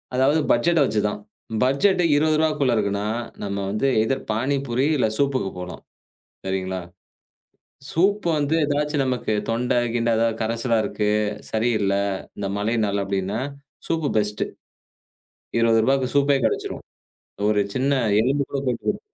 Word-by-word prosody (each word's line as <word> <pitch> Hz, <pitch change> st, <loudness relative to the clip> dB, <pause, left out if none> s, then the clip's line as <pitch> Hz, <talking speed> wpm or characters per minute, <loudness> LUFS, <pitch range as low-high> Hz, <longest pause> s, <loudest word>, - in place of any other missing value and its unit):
அதாவது 135 Hz, +5 st, +3 dB
பட்ஜெட்ட 165 Hz, +8 st, +3 dB
வச்சு 110 Hz, -, 0 dB
தான். 105 Hz, -, -5 dB, 0.5 s
பட்ஜெட் 180 Hz, +9 st, +3 dB, 0.2 s
20 155 Hz, +1 st, +3 dB
ரூவாக்குள்ள 150 Hz, -5 st, +2 dB
இருக்குனா, 100 Hz, -1 st, -1 dB, 0.4 s
நம்ம 100 Hz, -1 st, -3 dB
வந்து 110 Hz, +6 st, 0 dB
எய்தர் 130 Hz, +5 st, -1 dB
பானிபூரி 130 Hz, +2 st, 0 dB
இல்ல 125 Hz, -, +2 dB
சூப்புக்கு 135 Hz, -7 st, +1 dB
போலாம். 90 Hz, 0 st, -7 dB, 0.7 s
சரிங்களா? 95 Hz, -1 st, -2 dB, 1.1 s
சூப் 200 Hz, +5 st, +2 dB
வந்து 145 Hz, +2 st, 0 dB
ஏதாச்சும் 145 Hz, 0 st, 0 dB
நமக்கு 125 Hz, -4 st, -1 dB, 0.2 s
தொண்ட 120 Hz, +2 st, 0 dB, 0.2 s
கிண்ட 120 Hz, 0 st, +1 dB
எதாவது, 115 Hz, 0 st, +1 dB
கரச்சலா 115 Hz, +1 st, 0 dB
இருக்கு, 105 Hz, -1 st, -1 dB, 0.4 s
சரியில்ல. 110 Hz, -3 st, +1 dB, 0.4 s
இந்த 100 Hz, -1 st, -2 dB
மழைனால 105 Hz, -2 st, 0 dB
அப்டின்னா, 100 Hz, +2 st, -2 dB, 0.5 s
சூப்பு 160 Hz, -3 st, 0 dB
பெஸ்ட்டு. 105 Hz, 0 st, -1 dB, 1.1 s
20 115 Hz, -1 st, +4 dB
ரூபாக்கு 135 Hz, 0 st, +2 dB
சூப்பே 140 Hz, 0 st, +4 dB
கெடச்சுடும். -, -, -3 dB, 0.7 s
ஒரு 105 Hz, -1 st, +3 dB
சின்ன 135 Hz, +2 st, +1 dB, 0.3 s
எலும்பு 140 Hz, +4 st, +1 dB
கூட 140 Hz, -, -2 dB
போய் 120 Hz, -2 st, -1 dB
போட்டு. -, -, -1 dB
120 Hz, 130 wpm, -23 LUFS, 105-140 Hz, 1.1 s, 20